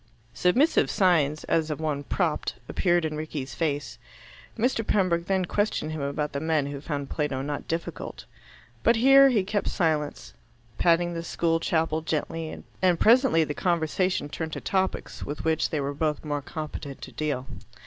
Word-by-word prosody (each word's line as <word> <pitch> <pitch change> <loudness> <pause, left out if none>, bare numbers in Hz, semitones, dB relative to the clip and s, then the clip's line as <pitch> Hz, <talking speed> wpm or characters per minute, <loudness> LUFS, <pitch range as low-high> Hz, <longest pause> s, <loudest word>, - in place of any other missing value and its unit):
Submissive 250 - +3
signs, 155 -6 +2
as 160 -1 +1
of 150 - -3
one 150 -3 -1
propped, 160 +1 -1
appeared 175 -2 +1
in 155 -1 -2
Rickie's 150 -3 -5
face. 145 -3 -2 0.6
Mr. 230 0 +1
Pembroke 175 -5 +1
then 190 -1 +1
questioned 205 -5 -1
him 155 -2 -4
about 140 +1 -2
the 140 - -3
men 155 -2 +1
who 140 0 -5
found 145 -3 -4
Plato 140 -4 -1
not 145 0 -4
difficult. 165 +1 -5 0.6
But 230 - +4
here 270 +4 +7
he 220 -7 +2
kept 205 +1 -1
silence, 150 - -1 0.5
patting 175 0 +3
the 165 - -3
school 165 0 0
chapel 160 -1 0
gently, 160 0 -3 0.2
and 180 -2 +3
presently 235 - +5
the 150 - -3
conversation 175 0 0
turned 160 +1 -5
to - - -3
topics 190 -1 -2
with 145 0 -5
which 160 -1 +1
they 155 - -1
were 140 0 -2
both 150 +1 -1
more 145 -1 -2
competent 150 -1 -6
to - - -8
deal. 145 -4 -2
160 Hz, 165 wpm, -26 LUFS, 150-180 Hz, 0.6 s, here